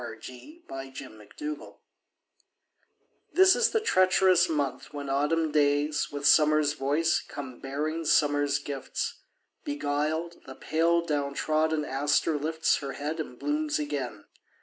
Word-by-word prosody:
Helen 115 -2 -8 0.5
Hunt 135 0 -8
Jackson 110 - -9 0.2
November 150 0 -6 1.6
THIS 380 +1 +6
is 475 -1 +3
the 445 - +1
treacherous 185 - +4
month 140 -5 -2
when 145 -2 -5
autumn 155 +3 +1
days 145 0 +1
With 145 0 -5
summer's 150 0 +5
voice 150 +4 +1
come 130 -4 -9
bearing 155 +4 -3
summer's 145 -1 +2
gifts. 140 -2 -5 0.4
Beguiled, 150 +4 -2
the 130 - -9
pale 170 +3 +1
down 145 -3 -2
trodden 155 0 0
aster 145 +3 +1
lifts 160 +2 +1
Her 140 -1 -5
head 150 +3 -4
and 125 -6 -6
blooms 300 +1 -1
again. 300 -1 -4
150 Hz, 125 wpm, -28 LUFS, 145-165 Hz, 1.6 s, THIS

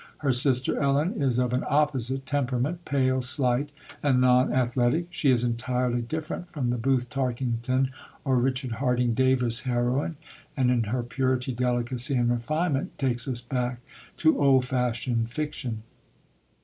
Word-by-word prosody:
Her 140 -3 +1
sister 125 0 +2
Ellen 145 +9 +1
is 130 -3 +1
of 125 -1 +1
an 125 - 0
opposite 135 -3 +1
temperament, 140 +4 -1
pale, 130 -2 +1
slight, 130 +2 +1 0.3
and 135 -3 +2
non 125 0 +4
athletic. 125 +5 +1
She 160 -4 +1
is 125 -2 +3
entirely 125 0 -1
different 160 +7 -5
from 130 -8 -2
the 120 - -1
Booth 125 0 +1
Tarkington 130 0 -1 0.3
or 130 -2 +2
Richard 130 0 0
Harding 125 0 +1
Davis 125 -1 +1
heroine, 125 +5 -1 0.4
and 125 -2 +3
in 120 -3 +1
her 120 +4 -2
purity, 130 +1 -1
delicacy, 125 +2 +1
and 120 -1 +2
refinement, 145 +5 -1
takes 125 -3 0
us 125 -3 -3
back 125 0 -2 0.4
to 160 -2 +3
old 135 -2 +4
fashioned 120 -2 -1
fiction. 120 -5 -4
125 Hz, 145 wpm, -26 LUFS, 120-135 Hz, 0.4 s, non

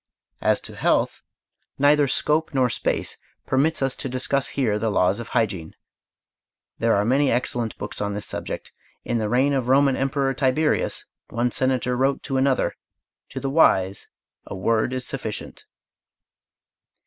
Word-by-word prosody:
As - - +2
to - - -7
health, - - +1 0.6
neither 145 +1 +4
scope 150 +3 0
nor 125 -2 +3
space - - -1 0.3
permits 140 +2 +1
us 135 -1 0
to 135 - -4
discuss 130 +2 0
here 110 -7 0
the 110 +1 0
laws 95 0 +2
of 115 - -6
hygiene. 95 -8 -1 1.0
There 115 0 +3
are 100 +1 +1
many 135 +4 +3
excellent 120 -1 -1
books 105 - -6
on 100 -1 -2
this 105 - -4
subject. - - -5 0.3
In 120 - 0
the 105 -1 -1
reign 130 +5 +2
of 130 -3 0
the - - +2
Roman 140 -1 +4
emperor 135 0 0
Tiberius, 135 +4 0 0.2
one 120 +2 0
senator 130 -1 0
wrote 135 +2 +1
to 135 -3 -2
another: 135 0 +1 0.5
"To - - -5
the 135 - -3
wise, 95 - +3 0.4
a - - -6
word 110 +5 +1
is 130 -1 -3
sufficient." 125 -6 -5
130 Hz, 155 wpm, -23 LUFS, 110-135 Hz, 1.0 s, neither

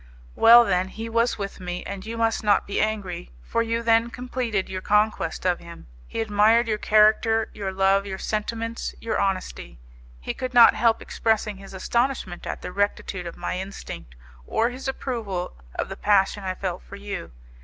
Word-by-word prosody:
"Well, 235 - +8
then, 185 -2 +1
he 225 +4 -7
was 230 +1 +1
with 200 -1 -5
me, 180 -1 -5
and 200 -1 -6
you 225 +2 -6
must 225 -1 +1
not 210 -1 +3
be 200 - -1
angry, 205 - -2
for 230 - 0
you 230 0 -1
then 230 0 +3
completed 245 -5 -2
your 185 0 -5
conquest 210 -5 +1
of 180 -1 +2
him. 170 0 -12 0.2
He - - -3
admired 220 +2 +4
your 215 -1 0
character, 220 +1 +3
your 200 -2 -4
love, 195 +1 +2
your 190 -1 -4
sentiments, 230 +3 -3
your 230 - -2
honesty. 185 - -2 0.4
He - - -4
could 255 -1 -5
not 235 -1 +9
help 225 +1 +2
expressing 215 -2 0
his 195 0 -11
astonishment 235 -3 -1
at - - -5
the - - -5
rectitude 200 -2 -2
of 170 - -8
my 180 - -3
instinct, 190 - -8 0.3
or 230 +2 +1
his 260 +2 -7
approval 225 - -3 0.2
of - - -2
the - - -6
passion 205 0 +2
I 185 -1 -2
felt 185 -2 -4
for 200 - -11
you. 200 -1 -6
210 Hz, 180 wpm, -24 LUFS, 190-230 Hz, 0.4 s, not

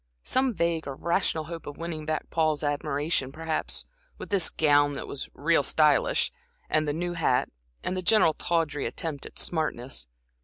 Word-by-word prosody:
Some 260 -3 +1
vague, 170 -2 0
irrational 160 +3 0
hope 165 +1 -8
of 145 - -7
winning 160 -2 -5
back 155 0 -1
Paul's 155 -2 +1
admiration, 145 -1 -1
perhaps, 160 +2 -2 0.3
with - - -8
this 195 -4 +3
gown 145 -2 +4
that - - -5
was 140 - -4
"real 165 +2 +3
stylish," 150 +1 +3 0.4
and 155 0 +3
the - - +2
new 175 +3 -2
hat, 155 -7 +1 0.3
and 185 - -1
the 185 - -2
general, 185 -4 +5
tawdry 155 -3 0
attempt 155 -4 -4
at - - -14
smartness. 130 - -2
155 Hz, 160 wpm, -27 LUFS, 145-170 Hz, 0.4 s, general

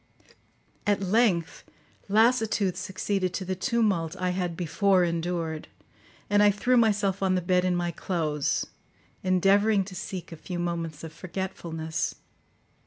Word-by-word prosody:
At 205 -1 +3
length 190 -4 +1 0.5
lassitude 220 -3 +3
succeeded 190 -1 -2
to 190 - -3
the 185 - -1
tumult 195 -6 0
I 180 0 0
had 180 -2 -2
before 185 +2 +2
endured, 170 -2 -2 0.6
and 205 0 +3
I 210 - +7
threw 210 +5 +2
myself 205 -4 +2
on 190 -1 +2
the - - +2
bed 180 +1 +2
in 180 -1 +1
my 175 0 -1
clothes, 155 -4 -1 0.6
endeavouring 195 +3 +3
to 190 0 -10
seek 180 -2 -6
a 165 - -8
few 175 +3 -6
moments 170 -3 -3
of 160 -1 -7
forgetfulness. 165 -4 -4
185 Hz, 135 wpm, -27 LUFS, 170-200 Hz, 0.6 s, I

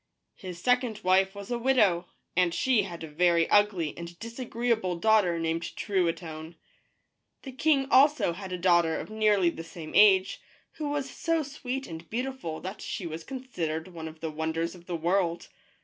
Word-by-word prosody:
His 180 -3 -9
second 250 0 +1
wife 190 +1 +3
was 200 +3 -8
a 240 - -1
widow, 210 -9 +3 0.3
and 175 -1 +2
she 255 0 +3
had 175 -4 -7
a - - -5
very 170 +2 +2
ugly 200 -7 +3
and 170 0 -8
disagreeable 230 -4 -2
daughter 195 -2 +3
named 165 +1 -2
Trui 185 -5 +1
tonne. 160 -1 -9 0.9
The 265 - -7
king 275 +1 +2
also 280 - +5
had 190 +1 -8
a 180 - -2
daughter 175 -2 +3
of - - -7
nearly 210 -5 +3
the 165 - -8
same 165 -1 -9
age, 195 -2 +5 0.4
who 305 -2 -3
was 290 -2 -2
so 330 +4 -1
sweet 270 -2 -5
and 165 0 -9
beautiful 250 -9 -4
that 190 +2 -7
she 185 - -5
was 160 0 -6
considered 180 - -4
one 165 -3 -7
of 155 0 -11
the 160 -1 -3
wonders 160 +2 -2
of 175 -1 -15
the 175 - -3
world. 170 +1 0
185 Hz, 175 wpm, -28 LUFS, 170-235 Hz, 0.9 s, also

